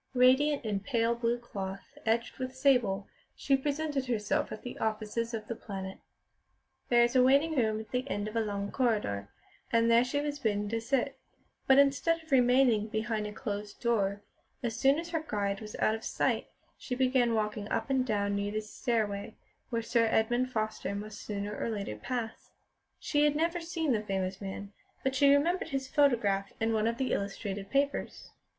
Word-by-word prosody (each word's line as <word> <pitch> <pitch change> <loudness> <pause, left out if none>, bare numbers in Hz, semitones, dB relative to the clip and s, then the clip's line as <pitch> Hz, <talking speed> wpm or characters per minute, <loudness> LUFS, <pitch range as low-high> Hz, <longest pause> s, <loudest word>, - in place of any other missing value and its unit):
Radiant 260 +2 +4
in 205 -2 0
pale 230 +2 +1
blue 235 0 0
cloth 195 -5 -7
edged 235 +3 0
with 255 0 -4
sable, 245 -8 +2 0.3
she 275 - +2
presented 285 0 -1
herself 215 -4 0
at - - -7
the 245 - -6
offices 220 +1 -2
of 220 -2 -4
The - - -2
Planet. 190 -4 -7 0.9
There 240 -1 +6
was 240 +2 +1
a 255 - +7
waiting 280 +5 +4
room 220 -4 +1
at 220 -1 -9
the 255 +2 -2
end 205 -3 -2
of 215 - -7
a - - +3
long 200 -2 -3
corridor, 205 - 0 0.4
and 230 0 +4
there 230 +1 +6
she 260 +3 -1
was 290 0 -3
bidden 210 -4 0
to 225 +1 -1
sit; 270 +3 -1 0.5
but 265 - +6
instead 280 +4 +3
of 315 - -20
remaining 245 -4 +4
behind 220 -1 -2
a - - -6
closed 205 -1 -5
door, 205 -4 0 0.4
as 230 -2 -1
soon 270 +5 +4
as 340 +1 -5
her 325 -2 -1
guide 200 -1 -1
was 215 -1 -8
out 215 - +2
of 225 - -5
sight - - 0 0.3
she 250 - -4
began 255 -2 +2
walking 210 -1 -2
up 230 +3 -1
and 265 -1 +3
down 205 -4 0
near 200 0 -1
the 215 +1 -1
stairway 215 -1 -2 0.3
where 230 -2 -1
Sir 230 0 +2
Edmund 240 +3 +1
Foster 215 -3 -2
must 210 +1 -6
sooner 205 0 -4
or - - -2
later 200 - -3
pass. 225 - -5 0.5
She 290 -1 +1
had 295 0 +3
never 335 +3 0
seen 330 -3 -1
the 220 -4 +2
famous 190 -2 -3
man, 200 +1 -6 0.3
but 265 - +1
she 280 +1 +5
remembered 325 +5 +2
his 270 -2 -2
photograph 230 -10 +2
in 225 0 +1
one 220 0 +2
of 230 0 -1
the 260 0 0
illustrated 200 0 -3
papers. 280 +1 -1
230 Hz, 185 wpm, -30 LUFS, 210-265 Hz, 0.9 s, a